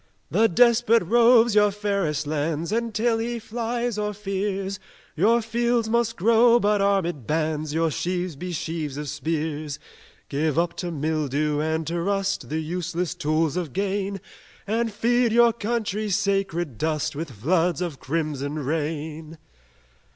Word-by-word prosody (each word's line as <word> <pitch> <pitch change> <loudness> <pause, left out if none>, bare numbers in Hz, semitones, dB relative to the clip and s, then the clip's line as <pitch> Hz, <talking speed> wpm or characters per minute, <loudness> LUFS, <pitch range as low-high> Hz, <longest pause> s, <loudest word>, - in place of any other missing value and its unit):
"The 225 - +4
despot 230 +1 +4
roves 235 +3 +5
your 210 0 +5
fairest 200 -7 -1
lands; 155 +3 -2
And 230 +1 -1
till 225 +1 +1
he 235 +1 -2
flies 235 0 -3
or 210 0 -2
fears, 195 -1 -3 0.4
Your 225 +7 +3
fields 235 0 0
must 235 0 +1
grow 230 +4 +5
but 205 -1 +2
armed 180 - 0
bands 155 -1 -1
Your 165 +1 +1
sheaves 180 +1 -2
be 180 +6 -6
sheaves 160 -3 -4
of 150 0 -4
spears: 155 0 -3 0.5
Give 150 +2 -1
up 170 0 +1
to 175 - -3
mildew 150 -1 -1
and 160 +1 -1
to 170 +2 -2
rust 195 +1 -1
The 160 +2 -1
useless 175 +2 -3
tools 160 -2 0
of 170 -7 -3
gain 200 0 -2 0.5
And 225 +2 0
feed 240 +3 +2
your 235 0 +5
country's 215 -3 -1
sacred 195 - -1
dust 155 -2 -1
With 160 +2 -4
floods 165 - +1
of 170 -7 -4
crimson 150 -2 -2
rain!" 155 +2 -3
180 Hz, 145 wpm, -24 LUFS, 155-215 Hz, 0.5 s, roves